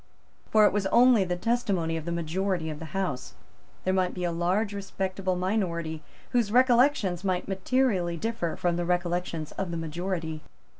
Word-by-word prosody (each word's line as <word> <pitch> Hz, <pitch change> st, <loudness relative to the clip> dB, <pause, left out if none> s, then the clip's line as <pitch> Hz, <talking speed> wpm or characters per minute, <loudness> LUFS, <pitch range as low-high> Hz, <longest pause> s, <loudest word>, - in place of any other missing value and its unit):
For 215 Hz, -1 st, +6 dB
it -, -, +4 dB
was 200 Hz, -2 st, +1 dB
only 240 Hz, -1 st, +5 dB
the 180 Hz, 0 st, -1 dB
testimony 195 Hz, -6 st, 0 dB
of 160 Hz, -1 st, -4 dB
the 170 Hz, -, -3 dB
majority 170 Hz, 0 st, -1 dB
of 150 Hz, -, -7 dB
the 160 Hz, +2 st, -9 dB
House. 175 Hz, -10 st, -3 dB, 0.5 s
There 185 Hz, -, +1 dB
might 185 Hz, -1 st, +1 dB
be 180 Hz, -, -4 dB
a 175 Hz, -, 0 dB
large 185 Hz, +5 st, 0 dB
respectable 190 Hz, -1 st, -2 dB
minority 175 Hz, -5 st, -1 dB, 0.3 s
whose 235 Hz, -5 st, +1 dB
recollections 245 Hz, -, +3 dB
might 185 Hz, -2 st, -1 dB
materially 190 Hz, -3 st, +1 dB
differ 225 Hz, -4 st, -2 dB
from 175 Hz, -1 st, 0 dB
the 175 Hz, -, -1 dB
recollections 175 Hz, -2 st, -1 dB
of 195 Hz, -2 st, -2 dB
the 170 Hz, -, -3 dB
majority. 165 Hz, 0 st, -3 dB
185 Hz, 165 wpm, -27 LUFS, 170-205 Hz, 0.5 s, For